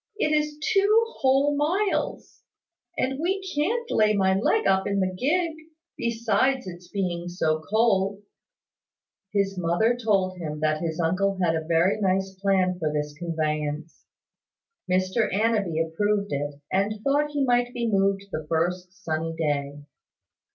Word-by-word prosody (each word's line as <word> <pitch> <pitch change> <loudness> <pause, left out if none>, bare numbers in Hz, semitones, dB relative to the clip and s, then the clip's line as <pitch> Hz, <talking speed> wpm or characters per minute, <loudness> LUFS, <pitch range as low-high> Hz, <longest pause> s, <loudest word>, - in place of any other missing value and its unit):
"It 305 -8 +1
is 300 0 -1 0.2
two 415 +3 +4 0.2
whole 275 +2 +3
miles; 365 +8 -1 0.6
and 270 +1 -1
we 370 +5 0 0.2
can't 460 +11 0
lay 215 -1 +3
my 190 -1 +3
leg 195 - +1
up 190 0 +2
in 200 0 0
the 185 -1 0
gig: 325 - +1 0.4
besides 235 +3 0
its 175 -1 -9
being 175 -3 -3
so 160 -3 0
cold." 200 -2 +2 1.1
His 195 -2 0
mother 180 +8 +2
told 195 -6 0
him 150 -3 -5
that 155 0 +1
his 165 -1 -3
uncle 185 +4 +1
had 165 -2 +2
a 160 - -2
very 170 +5 +2
nice 190 0 +1
plan 185 -2 +2
for 155 -3 -1
his 150 0 -2
conveyance. 155 -2 -3 0.9
Mr 185 +5 +1
Annanby 205 -5 +1
approved 205 +3 0
of 145 +1 -2
it, 145 - -25
and 205 +3 0
thought 290 +2 +2
he 290 -1 -1
might 245 -1 +2
be 240 -2 -2
moved 195 -1 +1
the 155 -3 -5
first 180 +4 -2
sunny 165 0 -2
day. 145 -2 -2
195 Hz, 145 wpm, -25 LUFS, 170-240 Hz, 1.1 s, two